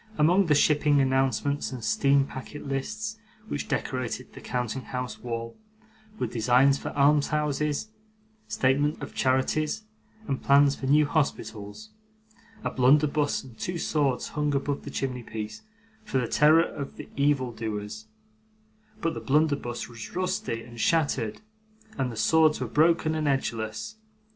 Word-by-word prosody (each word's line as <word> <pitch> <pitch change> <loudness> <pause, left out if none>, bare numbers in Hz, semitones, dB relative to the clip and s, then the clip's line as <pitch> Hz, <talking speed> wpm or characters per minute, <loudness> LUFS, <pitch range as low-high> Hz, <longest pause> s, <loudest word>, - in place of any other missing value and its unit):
Among 175 +5 +4
the 150 - +4
shipping 145 0 +4
announcements 135 +1 +1
and 125 -3 -7
steam 140 +5 +3
packet 140 +2 -8
lists 215 +11 -3 0.3
which 145 - -4
decorated 130 -1 -3
the - - -11
counting 125 +1 -3
house 125 -2 -5
wall, 115 -1 -5 0.6
were - - -1
designs 125 +4 +3
for - - -5
almshouses, 150 +3 +2 0.6
statements 145 +3 +1
of - - -7
charities, 150 +9 +1 0.4
and 135 - -2
plans 140 0 +5
for 135 - -5
new 150 +2 +5
hospitals. 145 - -3 0.7
A - - -1
blunderbuss 145 +3 +3
and 130 -4 -13
two 180 0 -3
swords 140 -6 0
hung 150 -1 -1
above 140 +1 -2
the - - -5
chimney 130 -2 -3
piece, 110 -1 -6 0.4
for 175 -11 -2
the 125 -2 0
terror 155 +5 +5
of 140 -4 -6 0.2
evil 140 -3 +1
doers, 110 -1 -5 0.9
but 165 - 0
the - - -5
blunderbuss 145 -4 0
was 115 -2 -10
rusty 130 -10 -2
and 120 -1 -12
shattered, 145 -9 +1 0.5
and 130 -3 -1
the - - -7
swords 155 +8 +4
were - - -2
broken 160 0 +3
and 155 -1 -1
edgeless. 115 - -2
140 Hz, 140 wpm, -27 LUFS, 125-150 Hz, 0.9 s, plans